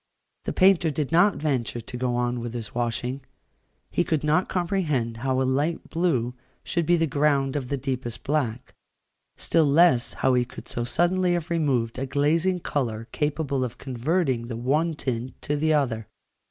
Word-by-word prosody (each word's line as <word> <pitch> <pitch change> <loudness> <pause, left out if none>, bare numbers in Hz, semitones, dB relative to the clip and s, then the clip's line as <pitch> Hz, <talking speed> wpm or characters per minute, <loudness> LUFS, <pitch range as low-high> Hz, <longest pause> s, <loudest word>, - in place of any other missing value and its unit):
The - - -2
painter 185 -3 +4
did 150 -1 -2
not 175 +5 +5
venture 130 -6 -1
to 120 +2 -8
go 125 0 -1
on 120 0 0
with 120 0 -5
his 115 -3 -5
washing: 120 +3 -2 0.7
he 175 - +2
could 160 -4 -1
not 155 +5 +2
comprehend 155 - -1
how 130 +2 0
a - - +2
light 145 +6 -1
blue 145 -9 +1 0.3
should 170 -2 -1
be 175 - +4
the 165 - +2
ground 140 -2 +1
of 135 -4 -2
the 140 - -1
deepest 125 -3 -4
black, 130 -6 -2 0.6
still 160 -3 +2
less 140 -5 +4
how 130 - +2
he 125 -1 +3
could 120 - -11
so 120 - -2
suddenly 175 +7 +2
have 175 -1 -3
removed 130 -8 0
a 135 - -2
glazing 160 +6 +1
colour 115 -8 -2
capable 145 -3 -1
of 120 -2 -5
converting 130 -1 -1
the 115 -2 -5
one 150 +7 +1
tint 125 -3 -4
to 150 - 0
the 155 +2 +1
other. 125 -8 0
140 Hz, 175 wpm, -25 LUFS, 120-160 Hz, 0.7 s, not